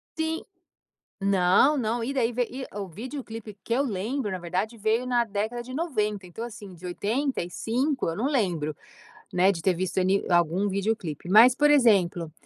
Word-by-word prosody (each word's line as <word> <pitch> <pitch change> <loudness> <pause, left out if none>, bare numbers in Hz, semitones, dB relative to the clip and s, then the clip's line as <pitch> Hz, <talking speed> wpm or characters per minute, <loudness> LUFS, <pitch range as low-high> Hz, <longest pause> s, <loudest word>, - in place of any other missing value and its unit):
Sim, 320 0 -2 0.8
não, 195 +8 +4
não. 230 -1 -1
E 265 +4 -2
daí 245 -3 +1
ve 245 0 -1
e 260 +1 -5
o 200 -2 -4
videoclipe 225 - -8
que 230 - -2
eu 275 +3 +2
lembro, 220 +1 -2
na 185 - -3
verdade, 185 +7 -3
veio 220 +3 +1
na 245 -1 +2
década 220 +3 -3
de 255 +2 -9
90. 215 - -1
Então, 180 +6 -7
assim, 210 -5 -10
de 175 +1 -12
85, 245 - -1
eu 165 - -3
não 230 +9 0
lembro, 175 - 0 0.6
né, 180 +2 +4
de 165 -4 -6
ter 190 -2 +2
visto 185 +2 -2
ali 190 +2 +2
algum 175 +3 +2
videoclipe, 195 -5 -2
mas, 225 +6 +8
por 295 +2 +3
exemplo, 195 - +3
215 Hz, 175 wpm, -26 LUFS, 185-250 Hz, 0.8 s, mas